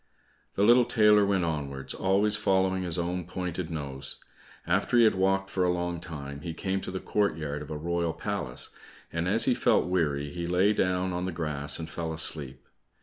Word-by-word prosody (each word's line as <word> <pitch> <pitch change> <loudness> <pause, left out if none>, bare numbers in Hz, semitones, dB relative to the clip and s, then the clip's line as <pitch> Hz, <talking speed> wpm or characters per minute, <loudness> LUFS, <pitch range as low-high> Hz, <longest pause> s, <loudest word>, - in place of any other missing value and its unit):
The 100 - +2
little 120 +3 +6
tailor 105 -3 +5
went 95 -2 +1
onwards, 70 -4 -4
always 100 +3 +3
following 95 -3 +1
his 90 -1 0
own 90 +1 -2
pointed 90 -1 -4
nose. 70 -4 -3 0.5
After 95 +7 +1
he 120 - +7
had 110 - +5
walked 95 +1 +1
for 95 - 0
a 90 - +2
long 90 -1 -2
time, 70 -4 -7
he 80 +1 -5
came 95 0 -2
to - - -6
the 95 0 -4
courtyard 80 -10 -1
of 75 - -9
a 75 - -4
royal 85 +1 -1
palace, 95 -12 -4 0.4
and - - -1
as - - +4
he - - +4
felt - - +2
weary, 75 -6 0
he 85 +2 -4
lay 90 +4 +3
down 90 -2 0
on 90 +1 -2
the 95 - -2
grass 75 -3 -2
and 80 - -5
fell 80 0 -4
asleep. 70 -4 -2
90 Hz, 195 wpm, -28 LUFS, 80-95 Hz, 0.5 s, he